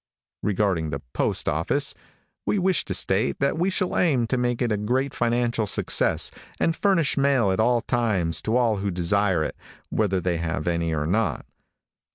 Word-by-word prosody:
Regarding 95 -6 0
the 70 -2 -5
postoffice, - - 0 0.5
we - - 0
wish 185 -1 +1
to 95 - -3
state 95 +6 +1
that 140 +2 0
we 180 +3 +2
shall 185 -1 -1
aim 140 -9 +2
to 115 - -1
make 125 -1 -1
it 120 -3 0
a - - +2
great 130 +6 -1
financial 120 -2 0
success, - - +2 0.3
and 165 - +1
furnish 185 -7 +1
mail 135 -7 +3
at 95 - -1
all 120 +1 +3
times 105 -11 0
to 110 +3 0
all 115 -4 +2
who 100 +1 -2
desire 90 0 +1
it, - - -4 0.4
whether 100 -3 +1
they 90 -1 -1
have 80 -2 -3
any 85 -1 0
or 75 -1 -1
not. 105 +7 -1
110 Hz, 175 wpm, -24 LUFS, 90-125 Hz, 0.5 s, mail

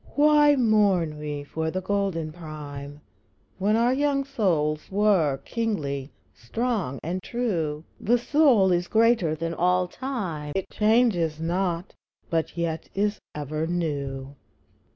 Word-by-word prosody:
I. - - -22
Why 295 0 +6
mourn 200 - +2
we 150 -1 -4
for 160 +3 -3
the 185 - -2
golden 185 -5 -1
prime 150 -3 -8 0.6
When 205 +3 +2
our 235 +2 +3
young 280 0 +1
souls 165 - 0
were 190 -9 +3
kingly, 150 - -2 0.2
strong, 200 - -2
and 180 +4 -3
true? 170 -11 -2 0.2
The 240 +3 +3
soul 245 -7 +4
is 175 0 +1
greater 220 -8 +3
than 165 +1 -3
all 180 +1 +2
time, 180 - -4
It 195 - -3
changes 210 -8 +2
not, 175 +1 -1 0.4
but 165 +1 -1
yet 165 -1 -2
is 205 +1 0 0.2
ever 150 +2 -3
new. 140 -5 -3
175 Hz, 130 wpm, -25 LUFS, 155-220 Hz, 0.6 s, Why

